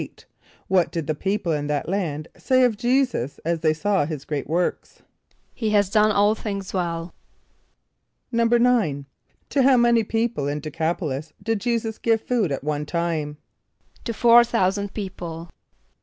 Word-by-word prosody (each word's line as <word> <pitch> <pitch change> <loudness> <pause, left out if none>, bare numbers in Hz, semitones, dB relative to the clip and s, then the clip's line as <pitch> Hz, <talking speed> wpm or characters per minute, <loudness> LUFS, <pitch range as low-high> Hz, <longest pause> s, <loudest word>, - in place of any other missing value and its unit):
= - - -37 0.2
What 185 -3 +2
did 165 -3 -3
the 155 - -1
people 190 +2 -2
in 145 -2 -1
that 145 -2 -2
land 165 -5 -2
say 255 -1 +2
of 245 -3 +3
J[=e]´[s+]us 245 - 0
as 170 0 0
they 160 -1 +2
saw 195 +4 +1
his 150 -3 -6
great 145 -3 -3
works? 170 +4 -2 0.5
="He 225 -3 -2
has 205 -2 +2
done 215 0 +4
all 205 +1 +3
things 200 -3 -5
well."= 170 -2 -3 1.2
=9.= 230 - +2 0.5
To 280 - +2
how 260 0 +5
many 235 -1 +4
people 225 -8 -1
in 145 +1 -2
D[+e] 155 +1 -7
c[)a]p´o 165 +3 -1
l[)i]s 145 +4 -5
did 225 0 0
J[=e]´[s+]us 230 -2 -1
give 225 -1 +2
food 225 - 0
at 135 - -3
one 150 0 -2
time? 160 -3 -2 0.7
=To 235 - -1
four 235 +1 +6
thousand 200 -4 -1
people. 175 -5 -6
190 Hz, 160 wpm, -23 LUFS, 155-230 Hz, 1.2 s, four